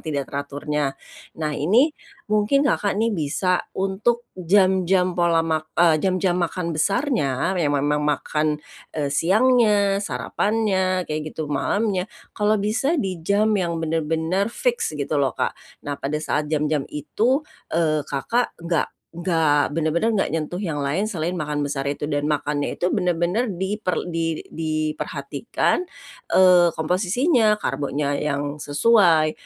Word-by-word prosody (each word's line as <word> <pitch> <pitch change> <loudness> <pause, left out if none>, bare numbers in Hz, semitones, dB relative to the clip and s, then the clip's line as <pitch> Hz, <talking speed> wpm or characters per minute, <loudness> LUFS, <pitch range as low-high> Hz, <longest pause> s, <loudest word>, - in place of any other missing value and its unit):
tidak 145 -3 -3
teraturnya. 145 0 -2 0.4
Nah 155 -1 -2
ini, 220 - +3 0.4
mungkin 215 +7 +3
Kakak 205 -8 +1
nih 225 +1 +1
bisa 175 +2 0
untuk 210 +5 0
jam-jam 185 0 +2
pola 170 -2 +2
mak 155 -1 -1
eee, 165 -3 +4
jam-jam 185 -1 +1
makan 170 0 -2
besarnya 190 - 0
yang 145 -3 +1
memang 145 +1 +1
makan, 150 +1 0 0.4
eee, 145 -2 -1
siangnya, 205 - +3
sarapannya 190 - 0
kayak 155 -1 -5
gitu, 160 - -2
malamnya, 200 +4 0 0.2
kalau 210 0 +2
bisa 225 +11 0
di 190 - -2
jam 205 +5 +2
yang 170 -3 -1
bener-bener 165 +4 0
fix 240 -4 -1
gitu 145 +1 -3
loh 135 -3 +1
Kak. - - -1 0.3
Nah, 145 - -2
pada 145 +2 -2
saat 150 0 -1
jam-jam 150 -1 +1
itu, 220 - 0 0.3
eee, 155 -2 +1
Kakak 230 - -1
enggak 170 -2 -1 0.3
enggak, 160 -5 +2
bener-bener 165 +8 +1
gak 195 - +1
nyentuh 165 +3 -3
yang 165 -7 -3
lain 185 +10 0
selain 175 -4 -2
makan 150 -4 -2
besar 140 -1 -2
itu. 145 +1 -3
Dan 145 0 -1
makannya 145 -1 -1
itu 180 - 0
bener-bener 180 +7 0
diper 190 -1 -2
di 165 -1 -2
diperhatikan, 155 - -2 0.5
eee 180 -2 +7
komposisinya, 210 - +2
karbonya 145 -6 -2
yang 145 0 -2
sesuai, 160 -1 +4
170 Hz, 130 wpm, -22 LUFS, 150-200 Hz, 0.5 s, eee